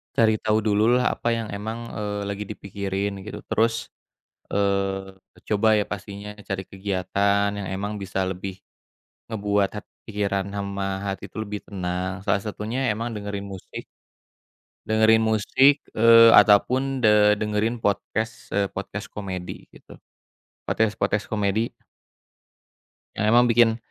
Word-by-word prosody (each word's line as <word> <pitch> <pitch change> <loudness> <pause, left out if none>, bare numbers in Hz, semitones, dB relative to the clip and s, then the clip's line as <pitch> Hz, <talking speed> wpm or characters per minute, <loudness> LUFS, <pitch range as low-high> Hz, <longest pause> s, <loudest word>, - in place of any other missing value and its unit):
Cari 110 -1 +3
tau 110 0 +1
dulu 105 -1 +2
lah 125 0 +2
apa - - -4
yang 115 -1 -3
emang, 110 +3 -5 0.2
eee, 105 -1 -3
lagi 100 +1 -3
dipikirin 100 +1 -3
gitu 105 - -7
terus, 115 0 0 0.6
eee, 95 -1 -1 0.3
coba 110 +1 +2
ya 105 - +1
pastinya 100 +1 -7 0.2
cari 95 -1 -2
kegiatan 100 +1 0
yang 100 - -4
emang 100 +2 -3
bisa 95 0 -3
lebih 95 0 -6 0.7
ngebuat 105 -2 0
hat - - -8 0.2
pikiran 100 -2 -1
sama 100 -1 -3 0.2
hati 95 -1 -4
itu - - -13
lebih 105 -1 -5
tenang 90 0 -4
salah 100 -1 +2
satunya 110 +4 -4
emang 115 +2 -4
dengerin 100 -1 -5
musik. 95 - -8 1.0
Dengerin 110 0 +4
musik, 120 +6 +3 0.2
eee, 115 0 +8
ataupun, 130 +6 +4
de 105 -1 +5
dengerin 105 +2 -1
podcast 110 +2 -2
eee, 100 -1 +1
podcast 100 +1 -6
komedi 95 -3 -6
gitu. - - -15 0.7
Podcast-podcast 105 -1 0
komedi 105 +2 0 1.4
yang 105 - -1
emang 120 +1 +6
bikin 115 -1 +4
105 Hz, 130 wpm, -24 LUFS, 100-110 Hz, 1.4 s, eee